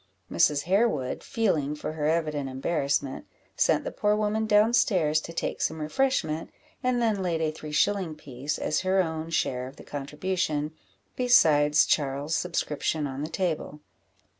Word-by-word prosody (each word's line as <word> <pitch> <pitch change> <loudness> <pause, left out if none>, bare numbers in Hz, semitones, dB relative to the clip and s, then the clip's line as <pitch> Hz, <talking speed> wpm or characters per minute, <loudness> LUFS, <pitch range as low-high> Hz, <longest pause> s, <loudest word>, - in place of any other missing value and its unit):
Mrs. 140 - +3
Harewood, 185 - +1
feeling 160 - 0
for 150 - -5
her 150 -1 -1
evident 155 -4 0
embarrassment, 140 0 -1 0.3
sent - - +2
the - - -4
poor 210 - +1
woman 215 +1 0
down 215 +2 +4
stairs 170 - +3
to 165 - -8
take 165 - -3
some 160 - -1
refreshment, 160 - 0 0.3
and 250 -2 +1
then 220 -4 +1
laid 175 -3 -1
a 160 -1 0
three 155 -1 -9
shilling 180 +1 +1
piece, 140 0 -5
as 155 - 0
her 190 0 +2
own 160 -1 -4
share 125 -6 -1
of 130 - -11
the - - -13
contribution, 150 +1 -2 0.4
besides 150 -12 +5
Charles's 145 +2 0
subscription 155 -3 -1
on 135 0 -5
the 155 - -3
table. 165 -4 -2
155 Hz, 155 wpm, -27 LUFS, 150-195 Hz, 0.4 s, besides